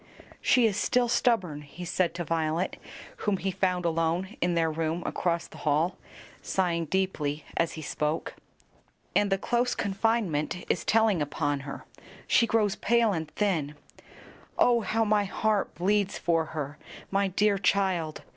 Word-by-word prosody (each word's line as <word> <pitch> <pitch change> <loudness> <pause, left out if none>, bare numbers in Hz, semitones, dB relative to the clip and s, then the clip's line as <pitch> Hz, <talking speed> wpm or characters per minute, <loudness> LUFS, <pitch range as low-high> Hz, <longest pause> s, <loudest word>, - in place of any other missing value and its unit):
"She 250 -2 +4
is 210 -3 +1
still 245 -1 +2
stubborn," 190 - +1
he 150 +5 -9
said 175 -1 0
to 175 - -2
Violet, 165 +2 -1 0.4
whom 205 -2 0
he 190 +1 -2
found 180 -1 0
alone 165 +5 0
in 175 0 +1
their 165 -1 +2
room 160 +2 -2
across 170 -2 -1
the - - -13
hall, 155 +4 +1 0.5
sighing 170 -3 0
deeply 155 -4 -1
as 170 - +1
he 155 - -7
spoke; 150 +2 -2 0.8
"and 205 -1 +3
the 195 - +3
close 240 +5 0
confinement 195 -6 0
is - - 0
telling 220 -6 +3
upon 145 0 -1
her; - - -7 0.4
she 230 - +4
grows 215 -3 +2
pale 230 -1 +2
and 160 -3 -3
thin. 160 -7 -1 0.8
Oh, 240 -1 +4
how 225 +1 0
my 210 -1 +2
heart 210 +1 0
bleeds 200 +2 +1
for 165 -2 +1
her, 150 -2 -5 0.3
my 195 0 +2
dear 200 +2 +2
child! 185 -5 0
180 Hz, 150 wpm, -28 LUFS, 160-205 Hz, 0.8 s, She